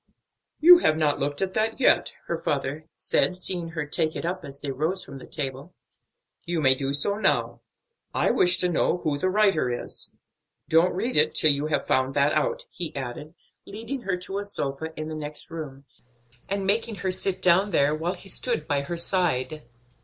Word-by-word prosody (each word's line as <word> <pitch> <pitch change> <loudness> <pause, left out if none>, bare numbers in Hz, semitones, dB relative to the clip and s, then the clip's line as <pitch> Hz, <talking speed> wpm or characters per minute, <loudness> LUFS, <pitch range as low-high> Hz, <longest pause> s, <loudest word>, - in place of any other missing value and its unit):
"You 350 +3 +9
have 155 - +2
not 150 -2 +1
looked 145 +5 -1
at 190 -1 -3
that 220 +2 0
yet," 260 - +3
her 170 - -2
father 145 +2 -3
said, 180 - +1
seeing 175 -2 -2
her 160 -2 -4
take 155 +1 -1
it - - -4
up 180 +1 -3
as 140 -1 -8
they 145 -1 -4
rose 160 +8 -1
from 135 - -9
the - - -12
table. 140 +3 -5 0.7
"You 170 -1 -2
may 135 -3 +5
do 135 +1 -3
so 200 +8 +2
now. - - 0 0.5
I - - +2
wish 180 0 +3
to 180 - +2
know 175 +1 +1
who 150 -4 -2
the 185 - +1
writer 195 -9 +2
is. 120 - -5 0.6
Don't 165 +3 +3
read 230 +7 -1
it 155 +1 +4
till 155 - +5
you 145 +1 0
have 155 - -1
found 130 +1 +1
that 145 +1 +3
out," - - 0
he 175 -3 -3
added, 135 +3 -6 0.3
leading 230 +6 -6
her 190 -4 -2
to 190 +2 -4
a - - -3
sofa 160 -6 -3
in 155 - -4
the 160 - -5
next 150 -1 -3
room, 140 -4 -7 0.6
and 200 0 -1
making 220 +3 +1
her 190 - +2
sit 185 0 -1
down 185 +3 +4
there, 145 -5 +2
while 165 +4 -2
he - - -14
stood 215 -6 -2
by 145 -1 +1
her 170 +5 -5
side. 155 -7 -1
160 Hz, 200 wpm, -25 LUFS, 145-190 Hz, 0.7 s, You